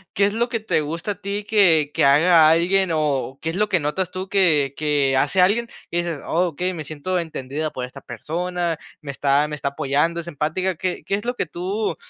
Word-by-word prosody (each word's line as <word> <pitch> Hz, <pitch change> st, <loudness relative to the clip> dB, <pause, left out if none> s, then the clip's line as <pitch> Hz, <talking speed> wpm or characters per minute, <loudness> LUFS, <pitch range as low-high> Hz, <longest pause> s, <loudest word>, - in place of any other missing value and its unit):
¿qué 200 Hz, -, +4 dB
es 205 Hz, -, 0 dB
lo 235 Hz, +2 st, 0 dB
que 230 Hz, -, -1 dB
te 215 Hz, -7 st, 0 dB
gusta 165 Hz, +7 st, -4 dB
a -, -, -4 dB
ti 200 Hz, +1 st, -4 dB
que, 165 Hz, -9 st, +4 dB
que -, -, +1 dB
haga 155 Hz, +3 st, +6 dB
alguien 185 Hz, +3 st, +3 dB
o 145 Hz, -4 st, -1 dB
qué 160 Hz, -, -1 dB
es 165 Hz, -, -7 dB
lo 210 Hz, +1 st, +1 dB
que 185 Hz, -, +2 dB
notas 165 Hz, +5 st, -2 dB
tú 185 Hz, +1 st, -6 dB
que, 155 Hz, -9 st, +2 dB
que 145 Hz, -3 st, +1 dB
hace 190 Hz, -, +1 dB
alguien, 210 Hz, +6 st, +3 dB, 0.2 s
dices: 170 Hz, -3 st, -2 dB
"Okey, 180 Hz, +1 st, 0 dB
me 160 Hz, -, -5 dB
siento 155 Hz, +5 st, -3 dB
entendida 155 Hz, -2 st, -4 dB
por 130 Hz, -4 st, -5 dB
esta 130 Hz, +2 st, -12 dB
persona, 175 Hz, +2 st, -3 dB, 0.3 s
me 145 Hz, -2 st, -6 dB
está 140 Hz, +1 st, +2 dB
me 150 Hz, -, -7 dB
está 140 Hz, -1 st, -4 dB
apoyando, 145 Hz, +5 st, 0 dB
es 170 Hz, -, -6 dB
empática"? 170 Hz, +4 st, -1 dB
¿Qué 180 Hz, +2 st, -3 dB
qué -, -, -4 dB
es 205 Hz, +2 st, -1 dB
lo 245 Hz, +1 st, -1 dB
que -, -, -1 dB
tú 190 Hz, +6 st, -3 dB
170 Hz, 220 wpm, -22 LUFS, 150-190 Hz, 0.3 s, haga